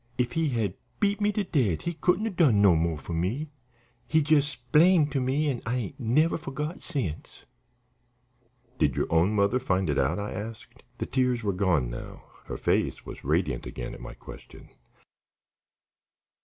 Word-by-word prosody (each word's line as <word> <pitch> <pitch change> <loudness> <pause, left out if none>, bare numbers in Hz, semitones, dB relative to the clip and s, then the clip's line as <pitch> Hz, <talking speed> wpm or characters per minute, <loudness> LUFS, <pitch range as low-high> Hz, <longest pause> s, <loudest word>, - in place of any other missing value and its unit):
If 125 -1 0
he 165 -2 0
had 110 -7 -1 0.3
beat 205 -1 +1
me 205 0 +3
to 210 - 0
death 125 - +1
he 170 - -3
couldn't 180 +6 +1
'a' 225 - -1
done 155 - +4
no 100 -4 +6
mo' 80 0 0
for 85 - -7
me. 115 - -2 0.6
He 160 - +2
jes' 150 -1 +3
splained 150 +5 +3
to 135 -2 0
me 135 +4 +1
an' 130 -4 -1
I 115 +2 -1
ain't 115 -1 -5
never 150 +9 +2
forgot 150 +3 -5
since." 115 - -5 1.3
"Did 70 -4 +2
your - - +1
own 90 +6 +3
mother 100 +5 +3
find 95 - 0
it 70 - 0
out?" 70 +5 +1
I 105 0 -4
asked. 110 +3 -8 0.2
The - - -3
tears 125 -3 0
were 100 -2 0
gone 90 -10 +1
now; - - -8 0.2
her - - -5
face - - 0
was - - -9
radiant 75 -3 0
again - - -6
at - - -10
my - - -8
question. - - -13
120 Hz, 175 wpm, -27 LUFS, 90-150 Hz, 1.3 s, no